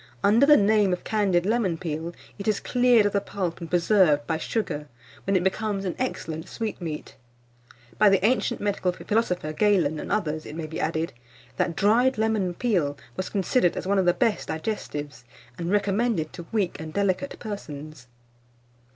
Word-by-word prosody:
Under 225 +7 +5
the 300 - +8
name 205 -2 +3
of 180 - -4
CANDIED 195 -5 +1
LEMON 210 -6 +1
PEEL, 165 0 -4 0.2
it 200 - -5
is 215 -2 +2
cleared 245 -3 +4
of 205 - +2
the 200 - +2
pulp 185 -5 -4
and 165 - -6
preserved 175 -5 +3
by 160 - -1
sugar, 155 -8 -3 0.4
when 195 - +2
it 180 - +3
becomes 195 +1 -1
an 180 - -1
excellent 160 -11 -4
sweetmeat. 175 -9 -5 0.8
By 210 - +7
the 195 0 +3
ancient 245 0 +1
medical 200 -3 0
philosopher 180 -6 -1
Galen, 165 -5 +2
and - - -6
others, 155 -6 -1
it 150 - -8
may 165 -1 -4
be 160 +1 -6
added, 160 +1 -1 0.4
that 170 - 0
dried 240 +7 +3
lemon 215 -5 0
peel 175 - 0 0.2
was 185 - -3
considered 195 -1 +1
as - - -4
one 195 +1 +2
of 185 - +1
the 175 - +5
best 230 -4 0
digestives, 150 - -4 0.4
and 170 0 -2
recommended 205 -3 +1
to 170 -2 -9
weak 205 -6 -1
and 160 0 -6
delicate 200 +6 0
persons. 155 - -8
190 Hz, 170 wpm, -25 LUFS, 160-215 Hz, 0.8 s, the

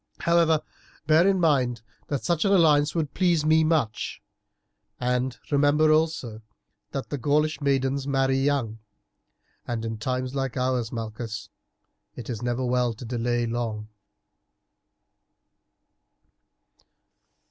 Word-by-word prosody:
However, 165 -2 +3 0.4
bear 160 +4 +5
in 195 -1 +3
mind 130 -8 +1 0.2
that 140 -3 -3
such 170 -3 +1
an 200 - +2
alliance 150 -5 +4
would 155 -4 -1
please 175 -4 +2
me 160 +1 +4
much, 155 - -1 0.8
and 125 +1 -1
remember 145 +2 +4
also 155 -8 0 0.5
that 135 - -5
the 145 - -2
Gaulish 150 +4 +1
maidens 135 0 0
marry 135 -1 +1
young, 135 -6 0 0.9
and 115 -2 -3
in 110 -1 -4
times 130 +2 -2
like 135 -2 -3
ours, 125 -2 0
Malchus, 115 -1 -6 0.7
it 125 0 -6
is 115 -2 -5
never 120 +1 -1
well 125 -2 +1
to 120 - -9
delay 120 0 -1
long." 115 -2 -3
135 Hz, 115 wpm, -25 LUFS, 120-155 Hz, 0.9 s, bear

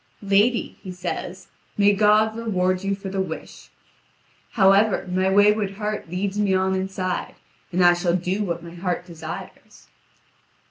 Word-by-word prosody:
"Lady," 205 +4 +1
he 190 - -7
says, 180 0 -6 0.3
"may 205 0 +5
God 215 +2 +3
reward 185 -5 -1
you 200 0 0
for 195 0 -7
the 190 0 -1
wish. 165 -4 -7 0.8
However, 195 -1 +4
my 185 +1 +1
wayward 205 0 +3
heart 210 -3 -4
leads 190 +3 -2
me 200 -2 +2
on 190 0 +1
inside, 190 -1 -3 0.4
and 180 0 +3
I 175 - +7
shall 175 0 0
do 185 +3 -1
what 170 -3 -3
my 170 0 -10
heart 175 0 -3
desires." 160 -3 -10
190 Hz, 145 wpm, -23 LUFS, 180-205 Hz, 0.8 s, I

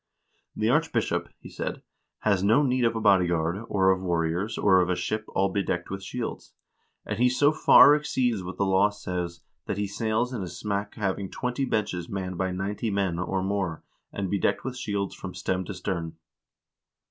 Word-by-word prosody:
"The - - 0
archbishop," - - +1
he - - -10
said, - - -5 0.4
"has 100 -3 +2
no 110 +8 +4
need 125 -2 +2
of 115 0 +1
a - - -1
bodyguard, 90 -2 +2
or 95 -1 +3
of 95 0 0
warriors, 85 +4 -1
or 95 -2 +5
of 90 - 0
a 90 - +2
ship 110 +4 -2
all 95 0 +3
bedecked 95 -3 -2
with 95 0 -4
shields; 115 +4 -5 0.5
and 105 0 -4
he 125 +1 +5
so 145 +4 +3
far 150 -1 +7
exceeds 130 -7 0
what 90 +1 -7
the 100 - +1
law 95 +2 +4
says, 90 -4 -5 0.3
that - - -2
he 105 - 0
sails 110 +4 -1
in 115 - -3
a 90 - -4
smack 100 +2 -4
having 100 -2 -2
twenty 125 +2 -2
benches 95 -8 -2
manned 95 -2 -4
by 95 - 0
ninety 100 +4 -2
men, 95 -4 0
or 95 +1 -1
more, 95 -4 -2 0.3
and 95 -2 -3
bedecked 100 - +1
with 130 0 -4
shields 100 -5 -2
from 90 -1 -8
stem 95 0 -2
to 100 - -5
stern. 85 -3 -3
100 Hz, 185 wpm, -26 LUFS, 90-110 Hz, 0.5 s, far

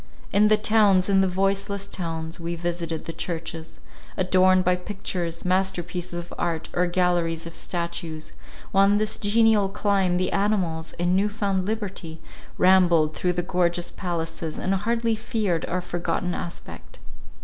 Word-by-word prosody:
In 210 +1 +5
the 215 0 +5
towns, 210 -3 +4
in 195 -1 +4
the 190 - +3
voiceless 195 +2 -1
towns, 165 -4 -5
we 170 0 -3
visited 170 -1 -3
the 165 - -5
churches, 165 -1 -5 0.4
adorned 185 0 +4
by 180 0 +3
pictures, 180 -3 -4
master 185 0 +1
pieces 180 0 -5
of 175 0 -7
art, 165 -2 -2
or 180 0 +2
galleries 175 -2 +1
of 170 - -8
statues—while 170 +2 -3
in 205 +1 +4
this 215 0 0
genial 215 -1 +3
clime 195 -3 +1
the 185 - 0
animals, 185 -6 0
in 175 +1 0
new 200 +2 +2
found 200 -3 -1
liberty, 195 -7 -4 0.4
rambled 175 -4 +4
through 180 +3 0
the 175 0 -1
gorgeous 175 -1 0
palaces, 165 -3 -4
and 190 - 0
hardly 230 +4 0
feared 215 -6 -1
our 180 +1 -1
forgotten 175 0 -2
aspect. 60 - -8
180 Hz, 150 wpm, -25 LUFS, 170-195 Hz, 0.4 s, In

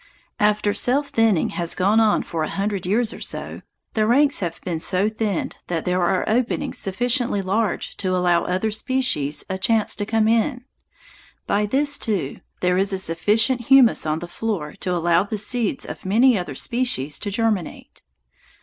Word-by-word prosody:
After 210 0 +2
self 275 +7 0
thinning 225 - +2
has 170 -1 -2
gone 200 +4 +3
on 220 -2 +3
for 165 - -4
a 155 - -1
hundred 195 -2 -2
years 220 +3 +1
or - - -11
so, - - -6 0.3
the 215 -1 +1
ranks 280 +5 +3
have 175 -4 -4
been 170 -3 -3
so 185 +4 +1
thinned 215 -4 -2
that 165 -2 -3
there 180 0 +1
are 185 +2 +1
openings 235 +2 -1
sufficiently 240 +2 0
large 205 +2 -1
to 185 -2 -1
allow 175 -1 +2
other 185 +4 -1
species 215 - -1
a 190 0 -4
chance 215 +2 +2
to 205 - -2
come 220 -1 +2
in. 245 +3 +1 0.8
By 210 +1 +1
this 285 +5 +1
time, - - -3
too, 145 -7 -4 0.2
there 180 0 +2
is 195 0 0
sufficient 220 +9 +1
humus 260 -10 +5
on 155 0 0
the 175 - -6
floor 175 -6 -4
to 185 - -2
allow 170 0 +2
the 205 +2 -4
seeds 220 +1 -1
of - - -8
many 235 +6 +4
other 175 -8 -4
species 195 - -1
to 205 - -3
germinate. 210 -4 -2
205 Hz, 175 wpm, -22 LUFS, 180-230 Hz, 0.8 s, humus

